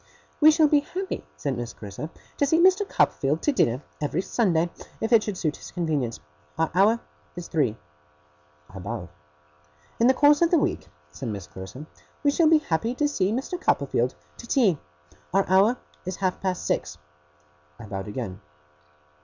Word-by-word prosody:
'We 310 Hz, -, +8 dB
shall 310 Hz, 0 st, +5 dB
be 295 Hz, 0 st, +4 dB
happy,' 375 Hz, +6 st, -5 dB
said 140 Hz, -2 st, -2 dB
Miss 120 Hz, -1 st, -5 dB
Clarissa, 105 Hz, +9 st, -7 dB, 0.3 s
'to 285 Hz, -, +3 dB
see 320 Hz, -, +3 dB
Mr. 375 Hz, +3 st, +4 dB
Copperfield 145 Hz, +4 st, +1 dB
to 295 Hz, -, +3 dB
dinner, 130 Hz, -, +1 dB, 0.2 s
every 150 Hz, +5 st, -1 dB
Sunday, 175 Hz, -8 st, +1 dB, 0.3 s
if 225 Hz, +2 st, 0 dB
it 225 Hz, -, +7 dB
should 210 Hz, -3 st, -4 dB
suit 155 Hz, -4 st, -1 dB
his -, -, -10 dB
convenience. 150 Hz, -, -2 dB, 0.4 s
Our 160 Hz, 0 st, +1 dB
hour 210 Hz, +6 st, +4 dB, 0.3 s
is 175 Hz, -1 st, -7 dB
three.' 130 Hz, -10 st, 0 dB, 0.9 s
I 95 Hz, -, -9 dB
bowed. 100 Hz, -1 st, -5 dB, 0.9 s
'In 235 Hz, -, +5 dB
the 260 Hz, -, +5 dB
course 290 Hz, +2 st, +5 dB
of 340 Hz, -, +5 dB
the 345 Hz, -, +4 dB
week,' 190 Hz, -, -1 dB, 0.2 s
said 120 Hz, -, -6 dB
Miss 100 Hz, -4 st, -5 dB
Clarissa, 95 Hz, +10 st, -9 dB, 0.4 s
'we 285 Hz, -, +4 dB
shall 315 Hz, +1 st, +4 dB
be 320 Hz, -, +7 dB
happy 225 Hz, -, -1 dB
to 295 Hz, +3 st, +2 dB
see 200 Hz, -9 st, 0 dB
Mr. 270 Hz, +10 st, -3 dB
Copperfield 130 Hz, -, +1 dB, 0.2 s
to 235 Hz, -, -10 dB
tea. 205 Hz, -, +3 dB, 0.6 s
Our 195 Hz, -, +3 dB
hour 195 Hz, +7 st, +4 dB, 0.3 s
is 185 Hz, 0 st, -4 dB
half 185 Hz, -1 st, -1 dB
past 185 Hz, -2 st, -2 dB
six.' -, -, -1 dB, 0.8 s
I -, -, -10 dB
bowed 95 Hz, -1 st, -5 dB
again. 105 Hz, -4 st, -5 dB
185 Hz, 170 wpm, -25 LUFS, -, 0.9 s, We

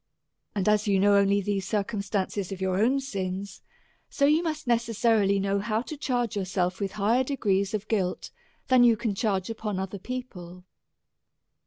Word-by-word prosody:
And 195 Hz, -1 st, -1 dB
as 210 Hz, 0 st, +3 dB
you 195 Hz, -2 st, +3 dB
know 200 Hz, +1 st, +4 dB
only 200 Hz, 0 st, +3 dB
these 195 Hz, -1 st, -2 dB
circum 205 Hz, 0 st, -1 dB
stances 200 Hz, -1 st, -2 dB
of 195 Hz, -, -5 dB
your 190 Hz, 0 st, 0 dB
own 255 Hz, +6 st, +3 dB
sins, 195 Hz, -6 st, -5 dB, 0.5 s
so 280 Hz, -, +1 dB
you 305 Hz, +3 st, +4 dB
must 310 Hz, -4 st, -4 dB
necessarilv 230 Hz, -4 st, +2 dB
know 200 Hz, +1 st, 0 dB
how 215 Hz, +2 st, -1 dB
to 305 Hz, -, -7 dB
charge 245 Hz, -6 st, -1 dB
yourself 185 Hz, -2 st, -1 dB
with 195 Hz, -2 st, -3 dB
higher 220 Hz, +5 st, +2 dB
degrees 200 Hz, -7 st, 0 dB
of 215 Hz, 0 st, -5 dB
guilt, 190 Hz, -5 st, -1 dB, 0.4 s
than 255 Hz, -2 st, +5 dB
you 235 Hz, -2 st, +5 dB
can 215 Hz, -1 st, -1 dB
charge 195 Hz, -1 st, -1 dB
upon 215 Hz, -3 st, -4 dB
other 190 Hz, +1 st, -4 dB
people. 185 Hz, -7 st, -7 dB
205 Hz, 170 wpm, -27 LUFS, 195-235 Hz, 0.5 s, than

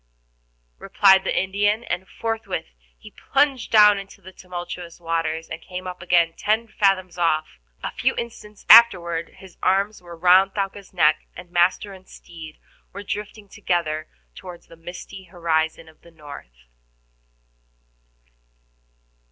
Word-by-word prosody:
replied 190 Hz, -1 st, +4 dB
the -, -, 0 dB
Indian, 205 Hz, +4 st, 0 dB
and 185 Hz, -4 st, -4 dB
forthwith 225 Hz, -1 st, -4 dB, 0.3 s
he -, -, -14 dB, 0.2 s
plunged 275 Hz, -3 st, +1 dB
down 210 Hz, -2 st, +6 dB
into 195 Hz, 0 st, -12 dB
the 190 Hz, -1 st, -13 dB
tumultuous 175 Hz, -2 st, -8 dB
waters, 165 Hz, -1 st, -2 dB
and 160 Hz, -, -8 dB
came 185 Hz, +1 st, -8 dB
up 180 Hz, 0 st, -7 dB
again 170 Hz, -1 st, +2 dB
ten 220 Hz, +2 st, 0 dB
fathoms 185 Hz, -5 st, 0 dB
off. 155 Hz, -, 0 dB, 0.2 s
A -, -, -3 dB
few -, -, -1 dB
instants 210 Hz, -3 st, -8 dB
afterward 175 Hz, -8 st, +6 dB
his 190 Hz, -2 st, -16 dB
arms 200 Hz, +2 st, 0 dB
were 170 Hz, -1 st, -12 dB
round 185 Hz, +3 st, +4 dB
Thaouka's 195 Hz, -1 st, -4 dB
neck, 155 Hz, -4 st, +2 dB
and 175 Hz, -, -11 dB
master 180 Hz, +3 st, +1 dB
and 185 Hz, -1 st, -15 dB
steed 160 Hz, -3 st, -12 dB, 0.4 s
were 200 Hz, +1 st, -8 dB
drifting 210 Hz, +1 st, -6 dB
together 170 Hz, -6 st, -2 dB, 0.3 s
toward 175 Hz, -, -11 dB
the -, -, -17 dB
misty 180 Hz, +3 st, -10 dB
horizon 165 Hz, -2 st, -2 dB
of 160 Hz, -, -20 dB
the 170 Hz, -, -18 dB
north. 145 Hz, -, -13 dB
180 Hz, 135 wpm, -22 LUFS, 165-200 Hz, 0.4 s, down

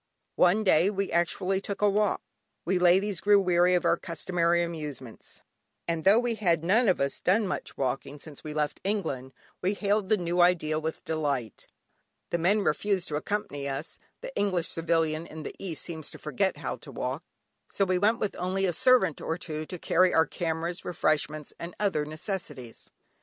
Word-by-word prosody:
One 185 Hz, +5 st, +4 dB
day 185 Hz, -1 st, +4 dB
we 200 Hz, -1 st, -2 dB
actually 185 Hz, +3 st, 0 dB
took 200 Hz, +1 st, -4 dB
a -, -, +6 dB
walk. 205 Hz, 0 st, +1 dB, 0.4 s
We 185 Hz, +1 st, +1 dB
ladies 185 Hz, +2 st, +3 dB
grew 205 Hz, 0 st, +5 dB
weary 180 Hz, -1 st, +3 dB
of 175 Hz, -, 0 dB
our -, -, +3 dB
customary 170 Hz, 0 st, 0 dB
amusements, 150 Hz, -8 st, -7 dB, 0.5 s
and 165 Hz, 0 st, -2 dB
though 200 Hz, +3 st, +7 dB
we 240 Hz, 0 st, +1 dB
had 175 Hz, -7 st, +1 dB
none 215 Hz, +8 st, +3 dB
of 185 Hz, -, +3 dB
us 140 Hz, 0 st, -1 dB
done 205 Hz, +4 st, +2 dB
much 185 Hz, -, -4 dB
walking 135 Hz, +2 st, -2 dB
since 145 Hz, 0 st, -10 dB
we 155 Hz, -, -6 dB
left 150 Hz, -1 st, -2 dB
England, 160 Hz, -11 st, -2 dB, 0.3 s
we 190 Hz, +3 st, 0 dB
hailed 200 Hz, -1 st, 0 dB
the 215 Hz, -, +4 dB
new 175 Hz, -1 st, 0 dB
idea 160 Hz, -3 st, +3 dB
with 160 Hz, 0 st, -5 dB
delight. 140 Hz, -, -2 dB, 0.6 s
The 170 Hz, -, 0 dB
men 200 Hz, +6 st, +3 dB
refused 195 Hz, +2 st, 0 dB
to 150 Hz, -, -2 dB
accompany 150 Hz, -5 st, -3 dB
us 140 Hz, +4 st, -5 dB, 0.2 s
(the -, -, -8 dB
English 185 Hz, -5 st, 0 dB
civilian 165 Hz, -1 st, 0 dB
in 155 Hz, 0 st, -8 dB
the -, -, -6 dB
East 170 Hz, -6 st, -4 dB
seems 160 Hz, -3 st, -6 dB
to -, -, -10 dB
forget 190 Hz, +5 st, -1 dB
how -, -, -4 dB
to -, -, -11 dB
walk) -, -, -3 dB, 0.5 s
so 195 Hz, -, +1 dB
we 185 Hz, -1 st, +1 dB
went 215 Hz, +4 st, +3 dB
with 210 Hz, -, -2 dB
only 185 Hz, +2 st, 0 dB
a 180 Hz, -, +1 dB
servant 255 Hz, -, +3 dB
or 165 Hz, -, -2 dB
two 155 Hz, -3 st, -5 dB
to 180 Hz, -, -6 dB
carry 180 Hz, +2 st, +3 dB
our 160 Hz, -, +5 dB
cameras, 165 Hz, +2 st, -3 dB
refreshments, 155 Hz, -2 st, -1 dB
and 170 Hz, +1 st, -7 dB
other 190 Hz, -8 st, +1 dB
necessities. 155 Hz, -, -6 dB
175 Hz, 185 wpm, -28 LUFS, 155-195 Hz, 0.6 s, though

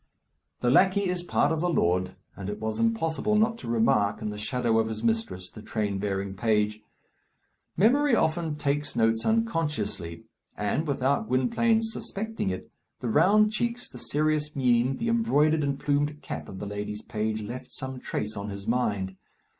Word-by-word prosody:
The 120 Hz, -, +3 dB
lackey 190 Hz, +6 st, +4 dB
is 180 Hz, -1 st, -2 dB
part 160 Hz, -4 st, +1 dB
of 160 Hz, -1 st, 0 dB
the 180 Hz, -, +1 dB
lord, 90 Hz, -, +1 dB, 0.2 s
and 100 Hz, 0 st, -6 dB
it 105 Hz, 0 st, -4 dB
was 110 Hz, 0 st, -3 dB
impossible 215 Hz, -3 st, +1 dB
not 225 Hz, +2 st, +2 dB
to -, -, -8 dB
remark, 110 Hz, -3 st, +2 dB
in 110 Hz, -1 st, -3 dB
the 105 Hz, -, -6 dB
shadow 115 Hz, 0 st, +1 dB
of 110 Hz, -, +1 dB
his 110 Hz, 0 st, -5 dB
mistress, 110 Hz, -6 st, -1 dB
the 110 Hz, -, -10 dB
train 105 Hz, -3 st, -2 dB
bearing 100 Hz, -1 st, -2 dB
page. 105 Hz, 0 st, +1 dB, 1.0 s
Memory 255 Hz, -, +4 dB
often 160 Hz, -4 st, +1 dB
takes 145 Hz, 0 st, -1 dB
notes 115 Hz, 0 st, +2 dB
unconsciously; 150 Hz, -, -1 dB, 0.3 s
and, 105 Hz, -, -1 dB
without 135 Hz, -4 st, +1 dB
Gwynplaine's 220 Hz, -, +2 dB
suspecting 220 Hz, -, -3 dB
it, 95 Hz, -, -5 dB, 0.3 s
the 120 Hz, -, -3 dB
round 205 Hz, -, +5 dB
cheeks, 235 Hz, +2 st, -2 dB
the -, -, -11 dB
serious 150 Hz, 0 st, 0 dB
mien, 125 Hz, -1 st, +2 dB
the 230 Hz, -, -2 dB
embroidered 160 Hz, -10 st, +3 dB
and 140 Hz, -1 st, -1 dB
plumed 145 Hz, +1 st, 0 dB
cap -, -, -6 dB
of 95 Hz, -, -8 dB
the 105 Hz, -, -5 dB
lady's 105 Hz, +1 st, -5 dB
page 110 Hz, 0 st, -2 dB
left 125 Hz, +4 st, -7 dB
some 130 Hz, -1 st, -5 dB
trace 105 Hz, -3 st, -3 dB
on 100 Hz, +1 st, -4 dB
his 100 Hz, 0 st, -7 dB
mind. 105 Hz, -5 st, 0 dB
125 Hz, 170 wpm, -27 LUFS, 105-165 Hz, 1.0 s, round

